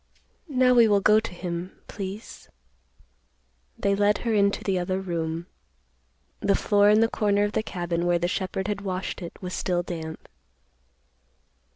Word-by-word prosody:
Now, 255 -2 +4
we 235 -2 +6
will 205 -2 +4
go 210 +2 +5
to 225 - -6
him, 175 0 -6
please." 200 +2 -8 1.3
They 200 - +1
led 205 +1 +3
her 230 - +1
into 200 -1 +2
the 190 -2 0
other 185 +1 -1
room. 170 -2 -3 0.9
The 200 - +2
floor 205 0 +4
in 215 +1 +5
the 225 - +5
corner 205 -2 +1
of 205 - 0
the 215 - 0
cabin 175 -4 -2
where 175 0 +3
the 175 +1 0
shepherd 190 +1 -2
had 205 -1 -2
washed 190 -1 -4
it 170 - -8
was 180 0 -4
still 175 -1 -1
damp. 160 -2 -7
195 Hz, 160 wpm, -25 LUFS, 175-210 Hz, 1.3 s, we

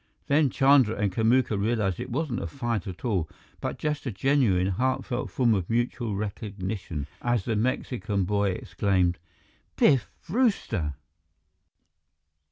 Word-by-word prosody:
Then 145 0 +3
Chandra 135 -4 +4
and 100 -1 0
Kamuka 110 +1 +2
realized 105 -4 0
that 125 - -3
it - - -11
wasn't 130 -1 -2
a - - -3
fight 120 -6 -3
at 95 +5 -7
all, 95 -9 0 0.3
but - - -3
just 150 -2 -2
a - - -1
genuine, 110 -5 +2
heartfelt 125 +4 -1
form 120 -3 +2
of 95 -5 -1
mutual 120 -2 -1
recognition, 100 - -4 0.2
as 120 -5 0
the 115 - 0
Mexican 105 -3 -1
boy 100 +1 +1
exclaimed: 90 -1 0 0.6
"Biff 135 -7 +4 0.2
Brewster!" 165 - 0
110 Hz, 135 wpm, -27 LUFS, 95-130 Hz, 0.6 s, Chandra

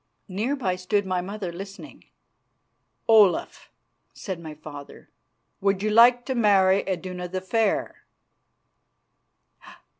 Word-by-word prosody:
Near 215 +8 -2
by 190 -10 -2
stood 200 +2 -1
my 185 -1 -1
mother, 195 -1 -6
listening. 195 +3 -10 1.0
"Olaf," 215 -5 +3 0.5
said 190 -5 -6
my 160 -2 -9
father, 145 -2 -12 0.5
"would 195 0 0
you 215 - 0
like 240 +2 +6
to 265 - -2
marry 200 -5 +4
Iduna 180 -1 -4
the 185 +1 -4
Fair?" 210 +3 -1
195 Hz, 110 wpm, -24 LUFS, 180-215 Hz, 1.0 s, like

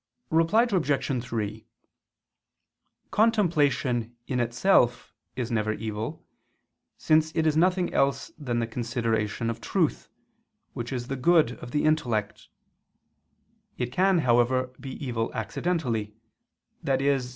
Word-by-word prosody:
Reply 165 +8 +4
Obj. 150 - 0
3: 110 -2 -4 1.4
Contemplation, 150 - +2
in 125 - -2
itself, 120 +1 +2 0.2
is 125 -2 -3
never 110 -1 0
evil, 110 +7 -5 0.7
since 155 0 +2
it 160 - +1
is 155 -1 +2
nothing 180 +2 +2
else 135 0 +1
than 125 -6 -3
the 115 - +1
consideration 115 -2 -2
of 115 - -8
truth, 60 0 -1 0.6
which 120 +2 -5
is 120 -2 -3
the 135 - -3
good 155 -1 +4
of 120 - -8
the 145 +4 0
intellect: 120 -10 0 1.3
it 125 -1 -2
can, 190 +4 +3
however, 125 +1 +2
be 135 -2 -7
evil 115 -3 -2
accidentally, 115 -4 -2 0.7
i.e. 135 +1 +2
125 Hz, 115 wpm, -26 LUFS, 115-155 Hz, 1.4 s, Reply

